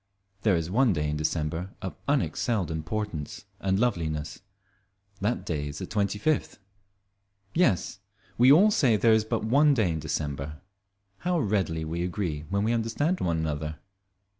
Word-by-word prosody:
There 105 -4 +3
is 85 +1 -2
one 120 0 +4
day 75 -2 -1
in - - -2
December 80 +4 -2
of 95 - -5
unexcelled 120 - 0
importance 80 0 -4
and 95 0 +1
loveliness; 80 -10 -1 0.8
that 105 +5 -1
day 75 -3 -2
is 75 0 -6
the - - -4
twenty 105 0 -1
fifth. 155 +7 0 1.0
Yes, 115 - +1 0.4
we 125 +3 +6
all 195 +9 +7
say 130 - +3
there 110 +2 +4
is 110 -1 +4
but 110 -1 -1
one 140 +5 +4
day 105 -8 +2
in 80 - -2
December. 75 -1 -4 0.6
How 180 0 0
readily 95 - 0
we 85 +2 -3
agree 85 -4 -3
when 100 +1 0
we 115 +2 +1
understand 120 +10 0
one 85 -2 +1
another! 75 -1 -3
95 Hz, 155 wpm, -27 LUFS, 80-115 Hz, 1.0 s, all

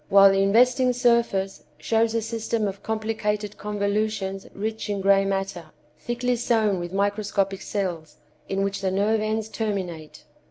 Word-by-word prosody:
while 195 0 +8
the 195 0 +2
investing 250 +5 +4
surface 235 -6 +1
shows 225 +7 +1
a 230 - +1
system 225 -1 -1
of 195 0 -6
complicated 215 -1 -2
convolutions 205 -1 -2
rich 220 +2 -4
in 200 -1 -1
gray 195 0 +4
matter, 195 -3 -2 0.3
thickly 245 +1 -1
sown 220 -5 +1
with 175 0 -5
microscopic 200 0 0
cells, 170 -7 -4 0.3
in 195 0 0
which 200 0 -2
the 190 - 0
nerve 205 +3 +1
ends 215 0 -1
terminate. 190 -8 -4
205 Hz, 145 wpm, -24 LUFS, 195-220 Hz, 0.3 s, while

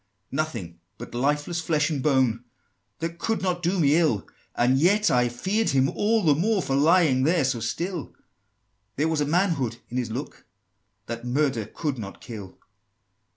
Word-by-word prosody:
XVI. 100 +1 -49
"Nothing 115 - -3 0.2
but - - -9
lifeless 145 +6 0
flesh 155 -2 +1
and 145 -3 -1
bone, 130 -5 +2 0.6
That 165 +1 -4
could 225 -3 -1
not 180 -2 0
do 180 +2 0
me 145 -2 +4
ill; 150 - +1 0.3
And 125 +2 +3
yet 205 +6 +3
I 125 -1 +3
feared 195 - -1
him 135 -1 +3
all 220 +1 +1
the 155 -3 +5
more, 195 +6 +1
For 135 - -1
lying 155 -2 +4
there 160 +1 +2
so 130 -3 0
still: 170 - -4 0.8
There 150 +3 +1
was 160 -2 0
a - - +2
manhood 160 - +1
in 125 - -4
his 125 -2 -1
look, 125 +6 -6 0.6
That 115 +1 -6
murder 125 -3 0
could 145 -6 -3
not 100 -3 -7
kill!" 105 -5 -9
145 Hz, 170 wpm, -25 LUFS, 120-170 Hz, 0.8 s, the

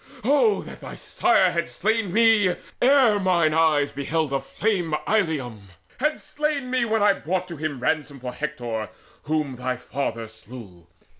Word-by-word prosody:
Oh 290 - +3
that - - -11
thy - - -8
sire 195 - +2
Had 170 0 -2
slain 220 -1 -1
me, 220 -3 +4 0.3
ere 250 -5 +5
mine 175 -5 +2
eyes 155 -3 +3
beheld 145 +1 -2
aflame 165 +4 -1
Illium, 140 - -1 0.3
had 300 +3 0
slain 295 -3 -3
me 255 -2 +2
when 220 -2 +1
I 205 -1 +5
brought 180 0 -3
to 170 - -6
him 150 -3 -3
Ransom 145 +1 -1
for 125 0 -6
Hector, 120 -9 -4 0.4
whom 150 -4 -1
thy 125 0 -2
father 125 -3 -4
slew. 110 -6 -13
160 Hz, 150 wpm, -24 LUFS, 135-220 Hz, 0.4 s, ere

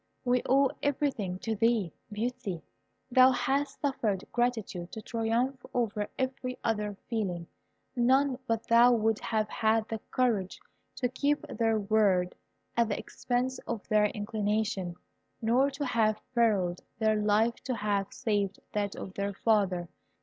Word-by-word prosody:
"We 250 0 +3
owe 275 0 +5
everything 260 -10 -1
to 225 -1 -1
thee, 225 -5 +2 0.2
Beauty. 215 -5 -3 0.5
Thou 255 +1 +7
hast 270 +3 0
suffered 225 -9 0
gratitude 220 -8 -1
to 220 - -5
triumph 235 +4 -1
over 210 -4 0
every 260 -1 -2
other 210 -3 -1
feeling. 190 -7 -2 0.5
None 260 +2 +3
but 225 -1 -1
thou 235 +1 +7
would 225 -1 +2
have 215 -1 0
had 220 0 +1
the 225 - -3
courage 220 -7 0 0.4
to 250 - 0
keep 285 +4 0
their 225 -1 +1
word 195 -4 +2 0.4
at 235 -1 +3
the 205 - -1
expense 250 +1 -2
of 230 -4 -4
their 210 -1 +4
inclination, 210 -3 -1 0.4
nor 245 +5 +3
to 280 +1 -4
have 220 -4 +2
perilled 200 -7 +2 0.2
their 215 -1 +2
life 215 +3 +2
to 255 - -1
have 200 -2 -1
saved 205 -3 -1
that 205 -1 -1
of 190 - -7
their 200 0 -3
father. 195 -6 +1
225 Hz, 140 wpm, -30 LUFS, 205-245 Hz, 0.5 s, Thou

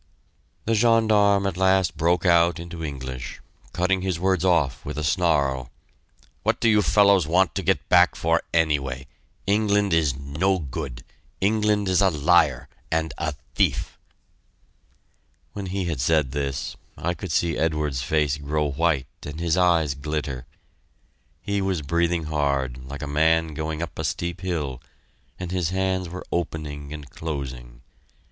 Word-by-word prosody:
The 115 - +1
gendarme 110 -3 +4
at 95 -3 -2
last 95 -2 +3
broke 85 +2 +1
out 85 -1 +4
into 85 -1 -7
English, 65 -3 -6 0.3
cutting 95 +1 +1
his 95 -3 -2
words 95 -1 +1
off 85 -8 +2
with 75 +1 -6
a 75 - -2
snarl: 75 -7 +1 0.7
"What - - 0
do - - +2
you 105 -2 +5
fellows 100 -3 +4
want 90 +2 +3
to - - -2
get - - 0
back - - +5
for 85 +1 +1
anyway? 70 -6 0 0.4
England 105 -1 +2
is 80 -5 +2
no 75 +8 0
good! 70 -5 -6 0.4
England 105 0 +2
is 95 0 +3
a 95 - +5
liar, 75 -4 +3 0.2
and 80 0 0
a 75 -3 -2 0.2
thief." - - 0 1.5
When 100 -2 -5
he 90 -3 -2
said 70 +1 +2
this, 70 -1 -3 0.2
I 85 +2 -1
could 95 -1 -6
see 85 +1 +1
Edwards's 75 -4 0
face 75 +1 +1
grow 75 0 -1
white 75 -2 +1 0.2
and 75 +2 -7
his 85 -1 +1
eyes 85 -5 +3
glitter. 70 -3 -4 1.0
He 100 0 -1
was 95 -5 -1
breathing 85 +2 +1
hard, 70 -4 -1
like 70 +2 -7
a - - -4
man 80 +2 +2
going 80 +2 -3
up 85 - -8
a - - -1
steep 85 +1 -3
hill, 75 -9 -3 0.6
and 90 -1 -5
his 90 -3 0
hands 95 -1 -1
were 90 +2 -7
opening 75 -4 -4
and 75 -2 -8
closing. 65 -6 -6
80 Hz, 150 wpm, -24 LUFS, 70-95 Hz, 1.5 s, you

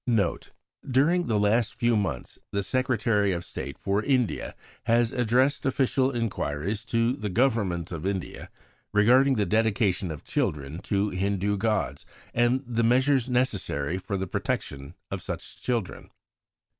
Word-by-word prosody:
NOTE 105 -8 0 0.4
During 160 +7 +3
the 110 -3 +1
last 105 +2 +2
few 120 -1 +2
months 95 -12 -3
the 100 0 -1
Secretary 110 -4 +1
of 85 0 -4
State 70 0 -6
for 100 +2 0
India 130 -4 0 0.3
has 115 0 +3
addressed 125 +4 +2
official 135 0 +2
inquiries 105 - -2
to 115 +1 +1
the 105 -5 -4
Government 100 -7 +1
of 80 -3 -5
India 95 -1 -4 0.4
regarding 130 +6 +5
the 105 -3 +1
dedication 105 -2 +1
of 80 -2 -7
children 75 +2 -2
to 100 +1 -1
Hindu 100 +2 0
gods, 110 +1 -1 0.3
and 120 +3 +2
the 115 -1 0
measures 130 +2 +3
necessary 95 - 0
for 100 +1 -3
the 95 - -2
protection 70 -5 -4 0.2
of - - -3
such - - -7
children. 120 -6 -3
110 Hz, 140 wpm, -26 LUFS, 95-125 Hz, 0.4 s, regarding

